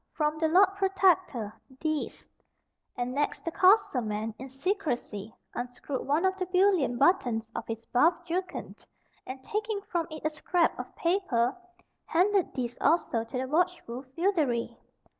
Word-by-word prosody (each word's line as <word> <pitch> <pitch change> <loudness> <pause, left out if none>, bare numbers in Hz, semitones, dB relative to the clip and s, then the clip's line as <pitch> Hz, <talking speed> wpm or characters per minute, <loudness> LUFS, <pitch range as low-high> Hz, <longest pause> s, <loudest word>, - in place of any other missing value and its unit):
From 305 0 0
the 320 - +3
Lord 370 +4 +6
Protector, 370 - +2 0.3
THESE:" 310 -2 -3 0.7
And 245 +1 -2
next, 290 +5 -1
the 335 - -1
courser 370 - +4
man, 215 0 -3
in 265 +1 -7
secrecy, 265 - -2 0.2
unscrewed 245 +2 -5
one 305 +6 +2
of 380 0 +2
the 370 - -1
bullion 365 -9 +3
buttons 245 -8 +2
on - - -1
his 225 0 -5
buff 325 +8 +5
jerkin, 360 +2 -4 0.5
and 260 0 -7
taking 425 +3 -2
from 340 -4 -2
it 310 -1 -8
a 310 - +2
scrap 340 +2 +1
of - - -7
paper, 310 -9 +1 0.5
handed 375 +3 +2
this 245 -2 -3
also 265 -8 +2
to 230 +3 -6
the 260 - -1
watchful 315 -5 0
feodary. 320 -10 +1
310 Hz, 145 wpm, -29 LUFS, 245-370 Hz, 0.7 s, Lord